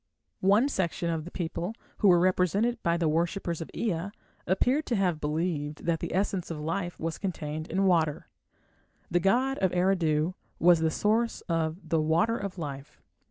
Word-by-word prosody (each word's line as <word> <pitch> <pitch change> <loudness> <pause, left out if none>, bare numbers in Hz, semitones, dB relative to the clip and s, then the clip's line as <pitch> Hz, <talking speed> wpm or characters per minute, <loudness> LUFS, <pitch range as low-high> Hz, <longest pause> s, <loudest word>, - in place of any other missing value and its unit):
One 205 +7 +4
section 170 - -1
of 160 -2 -3
the - - -7
people, 175 +4 -3 0.2
who 210 - +4
were 175 -2 +7
represented 185 +6 +2
by 170 0 +1
the 170 -2 +1
worshippers 170 +2 -1
of 165 - -6
Ea, 185 -4 -1 0.4
appear 250 - +2
to 255 -6 -2
have 180 -6 +1
believed 150 -1 -2
that 165 -1 +1
the - - -4
essence 190 -2 -1
of 165 -3 -4
life 170 +3 -3
was 165 0 -3
contained 155 -5 -4
in 190 +3 0
water. 160 -5 +2 0.8
The 175 - +3
god 250 +9 +2
of 190 -2 +2
Eridu 175 -3 +2 0.2
was 175 -1 +5
the 160 0 +2
source 220 +7 0
of 165 +1 -2
the 160 -1 +2
"water 165 +9 +2
of 200 -3 -5
life". 140 -4 -7
175 Hz, 170 wpm, -28 LUFS, 160-195 Hz, 0.8 s, were